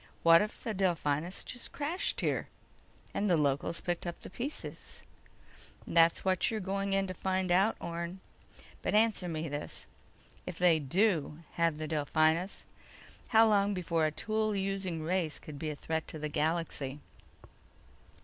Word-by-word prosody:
"What 165 0 +8
if 210 +1 -4
the 225 - -2
Delphinus 175 -3 0
just 245 - -5
crashed 310 +6 -1
here... - - 0 0.7
and 205 - 0
the 175 - +4
locals 150 +3 0
picked 175 0 -2
up 175 - -5
the - - -10
pieces?" 270 +8 -6 0.8
"That's 165 +1 +4
what 185 -1 +2
you're 220 - -2
going 195 0 -1
in 195 0 +2
to 185 - -4
find 185 0 -1
out, 195 +5 +4
Orne. 170 +2 -4 0.6
But - - 0
answer 215 -4 +3
me 165 -1 -3
this: 145 0 -5 0.6
If 170 - -5
they 175 -3 +5
do 165 0 +1
have 165 -2 +1
the 155 0 -4
Delphinus, 155 +4 +1 0.6
how 225 0 +6
long 205 -1 +3
before 170 -3 +1
a - - -2
tool 215 +5 -1
using 190 -4 -2
race 170 -2 0
could 145 -2 -9
be 155 - -2
a 150 - -4
threat 160 +2 -3
to - - -7
the 150 0 -3
galaxy?" 150 -3 -1
175 Hz, 155 wpm, -32 LUFS, 155-195 Hz, 0.8 s, What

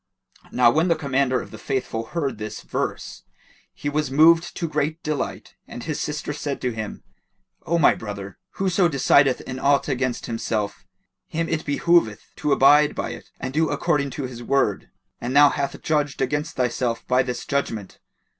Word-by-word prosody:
Now 120 -2 +5
when 160 +6 +2
the 170 - +3
Commander 135 -3 +1
of - - -9
the - - -10
Faithful 125 -4 -3
heard 140 -8 -3
this 110 0 -6
verse, - - -4 0.5
he - - -7
was 150 -1 0
moved 165 +4 +4
to 170 - -1
great 155 +1 -2
delight 155 -1 -3
and 120 - -8
his 155 -2 -3
sister 150 0 -3
said 145 -1 -4
to 125 - 0
him, 110 -2 -6 0.6
"O 170 - +2
my 165 - +5
brother, 100 -3 -7
whoso 185 -1 +2
decideth 140 -3 +3
in 130 0 -6
aught 140 +1 +2
against 130 -3 -1
himself, 110 -3 -3 0.4
him 165 +1 -2
it 160 -1 -2
behoveth 145 -6 +2
to 150 - -1
abide 145 +2 +5
by - - -3
it - - -10
and 130 - -4
do 160 +1 +2
according 145 -5 0
to 145 - -3
his 125 -2 -6
word; 120 -5 0 0.3
and 125 +3 -3
thou 145 0 +8
hast 140 0 -3
judged 145 -3 0
against 150 +1 -1
thyself 120 -1 -1
by 125 0 +4
this 125 -1 -4
judgement." 115 -9 -3
140 Hz, 175 wpm, -23 LUFS, 125-150 Hz, 0.6 s, thou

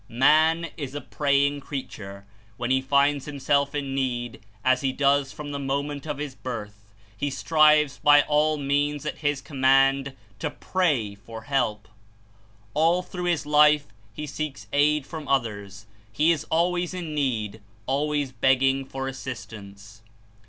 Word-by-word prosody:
Man 155 +6 +3
is 140 -3 -6
a - - -2
praying 140 0 +1
creature. 100 -9 -7 0.3
When 120 +1 -2
he 130 0 +3
finds 140 +1 +2
him 145 -1 -6
self 140 +1 +1
in 140 -2 -3
need, 120 -3 -2 0.2
as 130 0 +3
he 135 -1 0
does 140 0 +2
from 145 -1 -7
the 140 - -4
moment 140 +1 -3
of 150 - -3
his 145 -2 -5
birth, 105 -5 -8 0.2
he 145 +7 -2
strives 150 0 +3
by 145 0 +6
all 150 +1 +2
means 145 +1 -1
at - - -4
his 145 -2 -1
command 135 0 +2 0.2
to - - -2
"pray'' 145 - -1
for 110 +2 -11
help. 110 -6 -1 0.9
All 165 +4 +2
through 180 0 -6
his 170 -5 0
life 150 0 +4 0.2
he 150 +8 -6
seeks 150 0 -5
aid 150 +1 +3
Prayer - - -21
from 145 - -12
Others; 105 -6 -2 0.3
he 155 +9 +3
is 160 -4 -1
always 175 +2 0
in 170 -4 -5
need, 110 -7 -2 0.2
always 145 0 -1
begging 135 +2 +2
for 135 0 -5
assistance. 110 -5 -9
140 Hz, 150 wpm, -25 LUFS, 130-150 Hz, 0.9 s, by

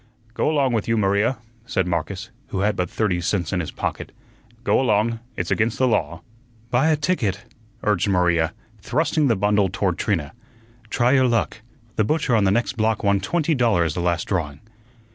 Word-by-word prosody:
"Go 130 - +1
along 140 -5 +2
with 110 - -1
you, 115 0 +1
Maria," 100 +5 +2 0.3
said 95 - 0
Marcus, 90 +4 -3 0.2
who 95 - -3
had 105 0 +1
but 90 -2 -1
thirty 95 -5 0
cents 90 +1 -1
in 90 - +1
his 80 - -3
pocket. - - -4 0.5
"Go 125 - +3
along; 115 -1 +1 0.2
it's 90 - -2
against 110 +2 +1
the 130 - +3
law." 110 -4 -1 0.5
"Buy 130 +5 +3
a 155 - +4
ticket," 120 - -1 0.4
urged 105 -2 +1
Maria, 85 -4 +2 0.3
thrusting 150 - +1
the 115 - +3
bundle 105 0 +2
toward 95 -1 -1
Trina. 80 -9 -1 0.6
"Try 120 +1 +2
your 130 -2 +4
luck. 115 -1 0 0.4
The 110 - +3
butcher 135 0 +1
on 105 -3 +3
the - - +4
next 120 +2 0
block 110 -1 +1
won 100 -1 +3
twenty 160 - 0
dollars 105 - +2
the 90 - -4
last 85 -1 0
drawing." 75 -7 -2
105 Hz, 180 wpm, -22 LUFS, 90-120 Hz, 0.6 s, a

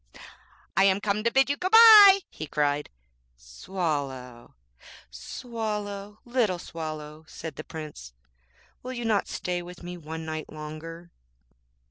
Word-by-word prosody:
'I 195 - +6
am 195 0 +3
come 205 0 -1
to 235 - +3
bid 270 +1 +4
you 285 - 0
good 365 +4 -2
bye,' 425 -4 +10
he 155 - -8
cried. 145 0 -1 0.5
'Swallow, 130 - -5 0.6
Swallow, 210 - -6
little 240 -7 0
Swallow,' 155 -2 -7
said 160 -3 -8
the 155 - -7
Prince,'will - - -12
you 240 -2 -5
not 215 -3 +1
stay 180 -1 -3
with 175 0 -11
me 175 0 -7
one 160 0 -7
night 155 -1 -6
longer?' 155 +3 -9
165 Hz, 125 wpm, -26 LUFS, 150-210 Hz, 0.6 s, bye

